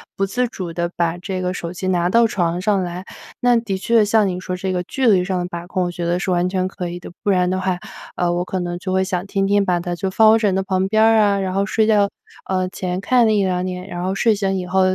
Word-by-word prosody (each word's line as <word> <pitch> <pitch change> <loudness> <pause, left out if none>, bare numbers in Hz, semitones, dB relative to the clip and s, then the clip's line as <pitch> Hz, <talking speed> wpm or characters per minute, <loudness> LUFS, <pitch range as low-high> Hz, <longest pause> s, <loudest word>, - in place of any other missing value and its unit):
不 195 - 0
自 245 +6 -1
主 185 -7 -6
地 170 +1 -2
把 170 0 0
这 185 +1 -4
个 180 0 -1
手 170 -1 -5
机 185 +1 -4
拿 175 -1 +1
到 230 +5 +4
床 175 -4 -1
上 200 -1 +1
来， 175 +1 -5 0.4
那 245 -1 +4
的 220 -4 -2
确 220 +2 +3
像 210 0 +3
你 180 -1 -3
说 185 0 -4
这 190 +1 -3
个 180 -1 -1
距 260 +7 -1
离 190 -5 +4
上 185 -1 -1
的 175 - -2
把 170 0 -7
控， 185 -1 -1
我 175 - -2
觉 175 -1 -4
得 175 +1 0
是 190 -1 -2
完 175 0 +2
全 185 -1 -1
可 180 -2 -5
以 175 +1 -6
的， 175 - -10
不 - - 0
然 180 -2 +2
的 185 - -1
话， 185 -1 -1 0.4
呃， 175 -1 0
我 175 +1 -1
可 185 - -3
能 175 0 -3
就 185 0 -3
会 190 - +2
想 185 -1 -2
天 195 0 0
天 205 0 +3
把 180 -2 +1
它 175 0 -3
就 190 +2 -2
放 215 +3 +5
我 225 - +5
枕 205 -4 +1
头 190 - 0
旁 190 0 0
边 220 +2 +3
儿 225 0 +5
啊， 200 -2 +3
然 190 -1 -2
后 195 +1 +1
睡 215 +2 +1
觉， 205 -2 +4 0.4
呃， 185 -1 -1
前 185 0 -4
看 245 +3 +3
了 220 - +3
1，2 185 -3 +1
眼， 180 +1 -6
然 175 0 -5
后 190 +1 -1
睡 220 +3 +2
醒 195 -1 -1
以 180 - -5
后， 190 +1 +2
185 Hz, 305 characters per minute, -20 LUFS, 180-200 Hz, 0.4 s, 放